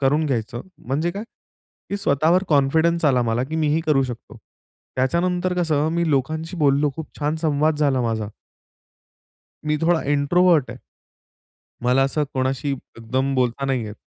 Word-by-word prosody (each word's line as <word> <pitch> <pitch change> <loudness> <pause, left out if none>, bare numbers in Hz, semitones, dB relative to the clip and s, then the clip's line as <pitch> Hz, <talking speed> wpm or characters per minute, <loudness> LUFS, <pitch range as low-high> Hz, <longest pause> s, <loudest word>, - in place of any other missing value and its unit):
करून 145 +3 +2
घ्यायचं 120 -2 -2 0.2
म्हणजे 150 +7 0
काय, 200 +4 -6 0.7
की 200 - -1
स्वतःवर 165 0 +2
कॉन्फिडन्स 160 +4 +2
आला 130 -4 +3
मला 115 +1 0
की 155 +4 -5
मीही 155 0 +1
करू 145 -3 +3
शकतो. 120 -3 -8 0.6
त्याच्यानंतर 175 +7 0
कसं 155 -2 +1
मी 170 0 0
लोकांशी 155 +5 -1
बोललो 145 -1 +3
खूप 160 - -5
छान 150 +1 -1
संवाद 155 0 +2
झाला 140 -4 +2
माझा. 110 -3 -2 1.4
मी 150 0 +1
थोडा 165 0 +2
इंट्रोव्हर्ट 155 +1 +3
आहे. - - -9 1.1
मला 125 +2 +3
असं 145 +3 0
कोणाशी 130 +2 -1 0.3
एकदम 130 +4 -1
बोलता 130 +1 0
नाही 130 -3 0
येत. 105 0 -8
145 Hz, 145 wpm, -22 LUFS, 130-160 Hz, 1.4 s, आला